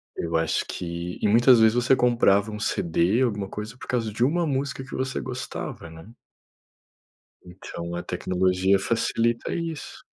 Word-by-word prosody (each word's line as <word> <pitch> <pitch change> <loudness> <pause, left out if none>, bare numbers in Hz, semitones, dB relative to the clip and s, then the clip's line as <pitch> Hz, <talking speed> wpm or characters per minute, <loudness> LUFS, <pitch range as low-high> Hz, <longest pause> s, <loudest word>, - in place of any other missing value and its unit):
Eu 85 0 -3
acho 80 0 0
que 85 0 -5
e - - +1
muitas 120 +3 +6
vezes 110 0 +5
você 125 +2 +3
comprava 110 -4 +3
um 105 - -6
CD, 90 +3 +1
alguma 105 -5 -1
coisa, 105 +3 -7
por - - -11
causa 115 -4 -1
de 120 - 0
1 170 +6 +2
música 140 -2 -2
que 135 - -13
você 130 0 -2
gostava, 125 -9 -6
né. 80 +7 -13 1.3
Então 85 -1 -7
a 90 - -4
tecnologia 95 +1 +1
facilita 115 +3 0
isso. 165 -3 -6
110 Hz, 155 wpm, -25 LUFS, 90-125 Hz, 1.3 s, muitas